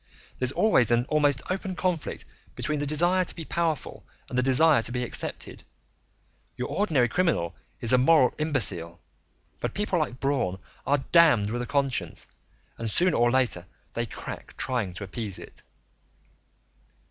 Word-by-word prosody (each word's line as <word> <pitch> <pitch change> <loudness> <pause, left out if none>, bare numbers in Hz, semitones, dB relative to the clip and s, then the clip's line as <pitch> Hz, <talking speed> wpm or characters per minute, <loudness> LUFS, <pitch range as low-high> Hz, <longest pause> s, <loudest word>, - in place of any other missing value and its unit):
"There's 130 0 0
always 210 - +3
an 120 0 +3
almost 145 -3 +2
open 190 0 -3
conflict 180 -4 -2 0.3
between 150 -1 -1
the 145 - -2
desire 175 +5 +3
to - - -7
be 165 - -7
powerful 165 -3 -2 0.2
and - - -7
the 125 - +3
desire 135 +2 +4
to 115 - -5
be 125 0 -1
accepted; 120 - -5 0.9
your 125 - -3
ordinary 155 -12 +2
criminal 150 - 0 0.3
is 115 - +3
a 125 - +6
moral 135 -1 +5
imbecile, 105 - 0 0.6
but - - -3
people 200 -3 0
like 130 -5 -2
Braun 130 -10 0 0.3
are 140 -1 +1
damned 145 -12 +5
with 120 +1 -2
a 120 - -4
conscience, 140 -2 -1 0.5
and 115 -1 -2
sooner 175 - +2
or 120 0 +4
later 120 -8 +1 0.3
they - - -2
crack - - -8
trying 115 -8 -1
to 100 - -7
appease 100 0 -4
it." - - -11
135 Hz, 155 wpm, -27 LUFS, 120-160 Hz, 0.9 s, a